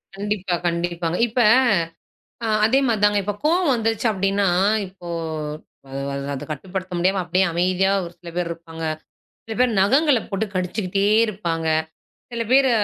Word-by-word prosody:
கண்டிப்பா, 200 Hz, -2 st, -2 dB
கண்டிப்பாங்க. 170 Hz, 0 st, -1 dB
இப்ப 235 Hz, +2 st, -3 dB, 1.1 s
அ -, -, 0 dB, 0.2 s
அதே 250 Hz, +5 st, +4 dB
மாரிதாங்க. 210 Hz, -2 st, +3 dB
இப்ப 205 Hz, +2 st, -2 dB
கோபம் 335 Hz, -1 st, +3 dB
வந்துருச்சு 225 Hz, 0 st, 0 dB
அப்டின்னா, 195 Hz, 0 st, +1 dB, 0.4 s
இப்போ 180 Hz, -2 st, -12 dB, 0.8 s
அத 135 Hz, -, -6 dB, 0.4 s
அதக் 135 Hz, -, -7 dB
கட்டுப்படுத்த 185 Hz, +4 st, -5 dB
முடியாம 190 Hz, +2 st, +2 dB
அப்டியே 180 Hz, +2 st, +1 dB
அமைதியா 185 Hz, +3 st, +2 dB
ஒரு 170 Hz, -, -9 dB
சில 175 Hz, -1 st, -11 dB
பேர் 175 Hz, -1 st, -1 dB
இருப்பாங்க. 165 Hz, -1 st, -7 dB, 0.6 s
சில 225 Hz, -, -6 dB
பேர் 245 Hz, -3 st, +2 dB
நகங்கள 270 Hz, +7 st, +4 dB
போட்டுக் 200 Hz, 0 st, -3 dB
கடிச்சுக்கிட்டே 185 Hz, +1 st, -1 dB, 0.2 s
இருப்பாங்க. 170 Hz, -6 st, -2 dB, 0.6 s
சில 235 Hz, -1 st, -2 dB
பேரு 265 Hz, 0 st, +5 dB
195 Hz, 135 wpm, -22 LUFS, 175-220 Hz, 1.1 s, பேரு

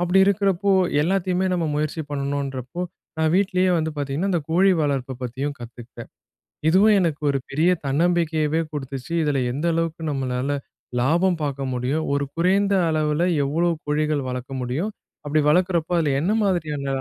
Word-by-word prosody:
அப்படி 175 Hz, +2 st, +3 dB
இருக்கிறப்போ 200 Hz, -1 st, +2 dB, 0.3 s
எல்லாத்தையுமே 185 Hz, +1 st, 0 dB
நம்ம 170 Hz, -2 st, 0 dB
முயற்சி 155 Hz, +2 st, -2 dB
பண்ணணுன்றப்போ, 140 Hz, +1 st, -3 dB, 0.4 s
நான் 160 Hz, 0 st, +2 dB
வீட்லயே 185 Hz, -1 st, +2 dB
வந்து 160 Hz, 0 st, -1 dB
பார்த்தீங்கன்னா, 145 Hz, +7 st, -1 dB
அந்த 175 Hz, -, +1 dB
கோழி 190 Hz, +4 st, +4 dB
வளர்ப்பை 135 Hz, -3 st, -1 dB
பத்தியும் 135 Hz, +4 st, -3 dB
கத்துக்கிட்டேன். 120 Hz, 0 st, -10 dB, 0.6 s
இதுவும் 205 Hz, +5 st, +5 dB
எனக்கு 165 Hz, -5 st, 0 dB
ஒரு 140 Hz, -, 0 dB
பெரிய 160 Hz, +6 st, +2 dB, 0.2 s
தன்னம்பிக்கையவே 160 Hz, +1 st, +1 dB
குடுத்துச்சு, 135 Hz, 0 st, -6 dB
இதில 145 Hz, -3 st, +1 dB, 0.2 s
எந்த 145 Hz, +4 st, -3 dB
அளவுக்கு 165 Hz, 0 st, -2 dB
நம்மளால 130 Hz, 0 st, -2 dB, 0.5 s
லாபம் 170 Hz, +6 st, +2 dB
பார்க்க 140 Hz, -1 st, -3 dB
முடியும். 130 Hz, +6 st, -1 dB
ஒரு 140 Hz, 0 st, 0 dB
குறைந்த 195 Hz, +4 st, +2 dB, 0.2 s
அளவில 155 Hz, 0 st, +1 dB, 0.2 s
எவ்வளோ 165 Hz, +5 st, +1 dB, 0.2 s
கோழிகள் 150 Hz, -2 st, 0 dB
வளர்க்க 125 Hz, +1 st, -5 dB
முடியும், 150 Hz, -, -2 dB, 0.3 s
அப்படி 150 Hz, +1 st, +1 dB
வளர்க்கிறப்போ 175 Hz, 0 st, +1 dB
அதில 150 Hz, -4 st, +1 dB
என்ன 180 Hz, +7 st, +1 dB
மாதிரியான 155 Hz, -7 st, -1 dB
155 Hz, 140 wpm, -23 LUFS, 140-175 Hz, 0.6 s, இதுவும்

